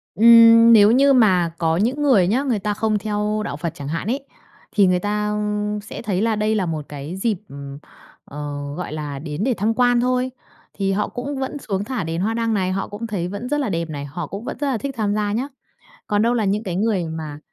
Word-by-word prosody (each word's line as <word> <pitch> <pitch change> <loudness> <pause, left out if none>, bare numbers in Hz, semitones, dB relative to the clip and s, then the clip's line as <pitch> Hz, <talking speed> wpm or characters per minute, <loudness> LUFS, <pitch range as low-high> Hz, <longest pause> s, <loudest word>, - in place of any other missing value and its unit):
Ừm, 230 +1 +8
nếu 210 -1 +7
như 275 +3 +5
mà 185 -9 +4
có 165 -1 +1
những 245 +9 0
người 250 -11 +4
nhá, 240 +8 +1
người 245 -7 0
ta 210 +1 -1
không 215 0 0
theo 210 0 -2
đạo 145 - -4
Phật 165 0 -4
chẳng 140 - -7
hạn 165 +5 -3
ấy, 270 +4 -2 0.5
thì 200 -3 +4
người 180 0 +2
ta 210 +1 -1 0.5
sẽ 215 - -8
thấy 200 -4 -1
là 225 0 +1
đây 215 +1 0
là 200 -3 0
một 155 -3 -4
cái 145 +4 -7
dịp, 210 -1 0 0.9
ờ, 145 0 -6
gọi 180 -4 -5
là, 145 -2 -5
đến 150 +4 -4
để 255 +1 +2
tham 215 +4 +1
quan 245 0 +3
thôi, 255 +1 0 0.4
thì 195 -1 -1
họ 205 +2 0
cũng 270 +3 -5
vẫn 265 +2 -3
xuống 200 -5 -3
thả 240 -3 -3
đèn 165 +1 -3
hoa 215 +4 0
đăng 230 -1 0
này, 185 -3 0
họ 195 +1 -2
cũng 210 +3 -6
thấy 190 -5 -3
vẫn 205 +7 -6
rất 295 0 0
là 270 - -1
đẹp 170 -2 -2
này, 145 -2 -5
họ 155 +3 -6
cũng 200 +7 -7
vẫn - - -5
rất 290 - -1
là 265 -4 0
thích 275 +4 -5
tham 205 -2 0
gia 210 -1 0
nhá. 245 +6 -1 0.6
Còn 205 0 +1
đâu 235 +1 +2
là 225 - 0
những 205 +2 0
cái 180 -4 -4
người 200 -3 0
mà, 155 -2 -6
210 Hz, 240 wpm, -21 LUFS, 175-230 Hz, 0.9 s, Ừm